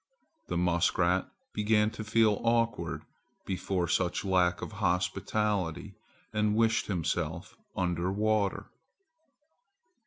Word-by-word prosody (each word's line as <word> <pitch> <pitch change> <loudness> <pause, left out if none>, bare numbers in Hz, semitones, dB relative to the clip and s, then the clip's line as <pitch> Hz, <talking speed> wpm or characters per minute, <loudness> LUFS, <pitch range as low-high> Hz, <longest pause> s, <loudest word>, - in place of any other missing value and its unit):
The - - -2
muskrat 90 +1 +2 0.2
began 105 0 +2
to 110 - -6
feel 110 -1 +2
awkward 115 -8 0 0.4
before 90 -1 -1
such 90 +3 0
lack 90 -2 +2
of - - -5
hospitality 95 +1 -1 0.4
and 105 -1 +1
wished 115 0 +2
himself 90 -6 -2 0.2
under 90 0 0
water. 105 0 0
95 Hz, 95 wpm, -30 LUFS, 90-110 Hz, 0.4 s, muskrat